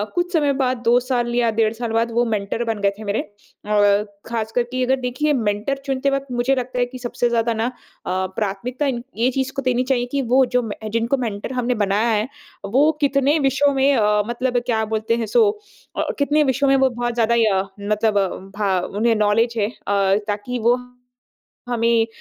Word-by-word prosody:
कुछ 355 0 0
समय 290 -4 +2
बाद 255 -2 0
2 240 +1 +5
साल 245 -1 -1
या 235 -1 +2
डेढ़ 220 -1 +2
साल 230 0 -4
बाद 230 +1 +1
वो 235 +1 +2
मेंटर 210 +3 -1
बन 225 -2 -2
गए 200 - +3
थे 215 - -9
मेरे। 200 +1 -1
अ, 205 0 0 0.2
खासकर 230 +1 -1
की 255 0 -1
अगर 265 +1 +3
देखिए 255 +5 0
मेंटर 220 +2 -1
चुनते 270 0 0
वक़्त 275 0 -1
मुझे 245 +2 +1
लगता 250 -1 -3
है 245 - +3
कि 255 +1 -10
सबसे 240 0 -1
ज़्यादा 230 0 +1
ना 225 +1 -1
अ, - - -3 0.4
प्राथमिकता 195 +8 -2
इन 245 -3 -2
ये 240 +2 +2
चीज़ 265 +1 -2
को 275 - -1
देनी 250 -1 +1
चाहिए 255 -2 0
कि 280 - 0
वो 260 0 +5
जो, 250 0 +1
म 230 - -6 0.3
जिनको 235 +4 0
मेंटर 230 0 -4
हमने 250 0 0
बनाया 205 +1 +1
है 215 +1 +1 0.4
वो 270 +10 +3
कितने 280 +1 +3
विषयों 275 0 +2
में 275 +1 +3
अ, 210 -2 +3
मतलब 245 +1 -1
क्या 220 -3 0
बोलते 220 +1 -1
हैं 230 - -1
सो 440 - +4 0.5
अ - - +1
अ, - - -1
कितने 295 +2 +3
विषयों 275 0 +1
में 275 - +5
वो 265 0 +4
बहुत 240 -1 -3
ज़्यादा 235 0 +2 0.2
अ, 190 - 0 0.2
मतलब 205 -2 0
भ 195 -3 -1
उन्हें 230 +1 +3
नॉलेज 215 +3 +2
है। 205 -2 +1
अ, 200 -4 0
ताकि 210 +4 -3
वो 240 +1 +5 0.9
हमें 230 -1 +2
240 Hz, 205 wpm, -21 LUFS, 215-260 Hz, 0.9 s, 2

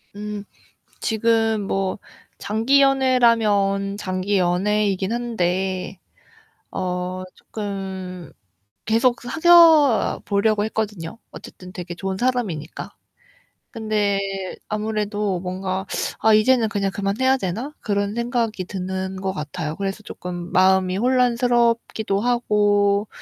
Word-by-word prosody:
음 210 0 -5 0.6
지금 225 -1 +1
뭐 195 +1 -1 0.4
장기 230 +7 +2
연애라면 230 -7 +3
장기 190 0 -1
연애이긴 195 +2 +1
한데 190 -5 -2 0.7
어 180 0 -3
쪼끔 190 -5 -6 0.5
계속 235 +2 +2
사귀어 315 - +5
보려고 205 +1 +2
했거든요. 210 -4 -4
어쨌든 180 0 -11
되게 180 -3 -6
좋은 190 +1 -4
사람이니까. 215 - -2 0.8
근데 215 -3 0 0.5
아무래도 210 -3 -2
뭔가 185 +1 -3 0.4
'아, 220 - +4
이제는 225 +1 +4
그냥 200 -2 -1
그만 200 +1 -2
해야 260 +1 +4
되나?' 230 - -4
그런 200 -1 -1
생각이 235 -4 -1
드는 190 0 -4
것 190 0 -2
같아요. 155 -2 -5
그래서 195 +1 -4
조금 175 -3 -7
마음이 185 0 +3
혼란스럽기도 235 -4 +1
하고 205 -3 +2
205 Hz, 240 characters per minute, -22 LUFS, 190-230 Hz, 0.8 s, 사귀어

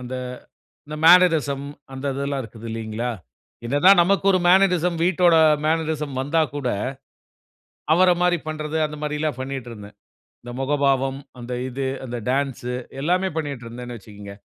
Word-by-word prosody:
அந்த 125 +1 -7 0.7
அந்த 150 +1 -7
மேனரிசம் 160 -6 +5 0.3
அந்த 135 +1 -7
இதெல்லாம் 140 0 -2
இருக்குது 115 0 -11
இல்லீங்களா? 115 +2 -3 0.5
என்ன 130 +5 0
தான் 195 -1 +8
நமக்கு 195 +3 +1
ஒரு 185 - +2
மேனரிசம் 180 -2 +3
வீட்டோட 175 -1 +4 0.3
மேனரிசம் 155 -3 -1
வந்தா 150 +4 +1
கூட, 140 -3 -3 1.3
அவர 180 +2 +5
மாரி 180 0 +3
பண்ணுறது 155 0 -3
அந்த 150 0 -6
மாதிரிலாம் 150 -2 -2
பண்ணிட்டு 130 -2 -5
இருந்தேன். 105 -2 -11 0.5
இந்த 120 - -8
முகபாவம், 135 -1 +1 0.2
அந்த 120 +1 -6 0.2
இது 135 +2 -4 0.2
அந்த 120 -1 -5
டான்ஸ், 135 -2 -1 0.3
எல்லாமே 180 +5 +1
பண்ணிட்டு 140 -6 -4
இருந்தேன்னு 120 +1 -8
வச்சுக்குங்க. 100 -1 -11
140 Hz, 135 wpm, -22 LUFS, 125-165 Hz, 1.3 s, தான்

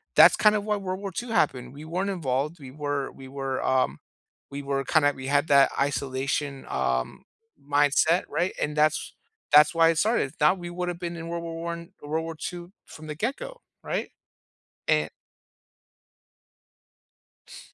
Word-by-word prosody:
that's - - +8
kind 210 0 +4
of 205 0 -1
why 210 - +1
World 190 -1 -4
War 200 -1 -5
II 240 +7 -4
happened. 135 - 0
We 150 +2 -10
weren't 180 +5 -2
involved. 150 -2 -1
We 135 - -10
were 145 -1 -3
we 135 -1 -11
were, 135 -1 -3
um, 130 -1 +1 0.5
we 140 +1 -5
were 135 0 -1
kinda 145 0 +3
we 130 0 -7
had 145 +2 +2
that 140 -1 +6
isolation, 140 0 -1
um, 60 -1 -1 0.5
mindset, 145 +4 +3
right? 175 +5 0
And 150 0 -1
that's 155 0 +1 0.4
that's 150 +2 +8
why 165 0 +6
it 165 - +1
started. 205 - +1
Now, 150 +4 +6
we 175 -1 -7
would 180 +1 -4
have 175 0 -5
been 170 -1 -4
in 165 0 -6
World 170 0 -3
War 165 0 -6
I 170 +1 -5
World 160 +2 -2
War 165 0 -6
II 175 +2 -7
from 155 0 -12
the 150 - -5
get 230 - -2
go, - - -9 0.2
right? - - -3 0.8
And - - +2 2.4
S - - -14
155 Hz, 175 wpm, -26 LUFS, 140-175 Hz, 2.4 s, that's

